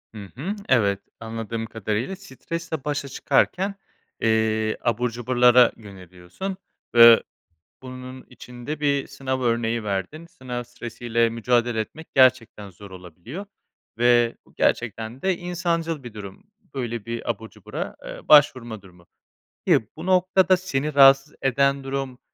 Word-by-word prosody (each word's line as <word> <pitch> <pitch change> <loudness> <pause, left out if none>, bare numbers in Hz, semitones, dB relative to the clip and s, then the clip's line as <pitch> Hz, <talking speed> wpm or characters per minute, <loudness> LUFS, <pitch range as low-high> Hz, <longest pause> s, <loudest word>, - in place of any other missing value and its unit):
Hı 105 -2 -8
hı. 180 +11 -4
Evet. 100 -6 +3 0.2
Anladığım 115 0 -5
kadarıyla 110 - -3
stresle 165 -3 -6
başa 145 -1 -3
çıkarken, 190 +8 0 0.5
eee, 110 -1 +1
abur 120 +1 0
cuburlara 125 +1 +4
yöneliyorsun 95 - -8 0.4
ve 115 -1 +9 0.6
bunun 130 0 -9
için 125 -1 -12
de 150 0 -3
bir 140 -2 0
sınav 130 -2 -4
örneği 115 -1 0
verdin. 100 - -4
Sınav 125 -6 -7
stresi 120 0 -10
ile 115 0 +2
mücadele 120 0 0
etmek 155 +9 -6
gerçekten 125 -6 +3
zor 100 +2 -14
olabiliyor. 95 - -9 0.5
Ve 120 0 +3
bu - - -24
gerçekten 115 +2 -1
de 190 -2 0
insancıl 170 -3 -2
bir 120 -3 -9
durum. 100 - -10 0.3
Böyle 120 -5 -4
bir 115 0 -5
abur 110 0 -4
cubura, - - -7
aaa, - - -10
başvurma 125 -7 +4
durumu. 90 -2 -19 0.6
Peki, 110 - +3
bu - - -8
noktada 185 0 +3
seni 150 -5 -3
rahatsız 135 +1 +6
eden 140 +1 +1
durum 135 -2 -4
120 Hz, 130 wpm, -23 LUFS, 110-140 Hz, 0.6 s, ve